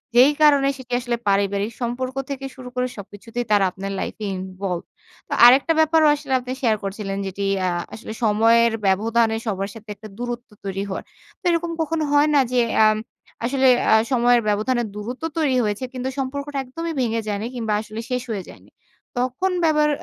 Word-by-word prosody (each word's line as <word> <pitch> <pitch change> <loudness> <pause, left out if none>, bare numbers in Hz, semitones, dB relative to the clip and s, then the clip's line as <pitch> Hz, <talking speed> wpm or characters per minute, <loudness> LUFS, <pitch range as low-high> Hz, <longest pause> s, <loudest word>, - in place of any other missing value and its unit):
যেই 260 +4 +7
কারণে 285 -2 +6
সেটি 250 -1 -9
আসলে 240 -1 -2
পারিবারিক 200 +2 +1
সম্পর্ক 255 +2 -3
থেকে 270 -1 -4
শুরু 255 -2 -9
করে 250 0 0
সবকিছুতেই 210 +4 -6
তারা 200 -2 +5
আপনার 195 +1 -6
লাইফ - - -4
এ - - -2
involved 185 -1 -5 0.4
তো - - -4
আরেকটা 265 +6 +7
ব্যাপারও 315 0 +5
আসলে 285 -2 -4
আপনি 250 0 -7
শেয়ার 225 -4 +3
করছিলেন 195 0 -4
যেটি 200 +1 -4 0.2
আ - - +2 0.2
আসলে 220 0 -7
সময়ের 225 +2 +4
ব্যবধানে 225 +3 +2
সবার 195 -2 -2
সাথে 225 -1 -13
একটা 215 +2 -11
দূরত্ব 240 0 -5 0.2
তৈরি 195 0 -2
হওয়ার। 190 - -4 0.4
তো - - -58
এরকম 335 0 0
কখনো 320 0 -1
হয় 290 +1 +5
না? 290 - +5
যে 250 - +4 0.2
আম 215 0 +4 0.5
আসলে 265 +1 +2 0.2
আ - - +7 0.2
সময়ের 245 -1 +4
ব্যবধানে 240 +4 +1
দূরত্ব 245 +8 -6
তৈরি 275 -5 +2
হয়েছে, 210 +3 -2
কিন্তু 255 +1 -3
সম্পর্কটা 280 +2 -4
একদমই 330 +6 -5
ভেঙে 230 -2 0
যায়নি 205 +2 -2
কিংবা 220 -3 -1
আসলে 215 0 -8
শেষ 250 -1 0
হয়ে 195 -4 -3
যায়নি। - - -15 0.5
তখন 255 +10 0
আবার 300 -1 +3
240 Hz, 175 wpm, -22 LUFS, 210-265 Hz, 0.5 s, যেই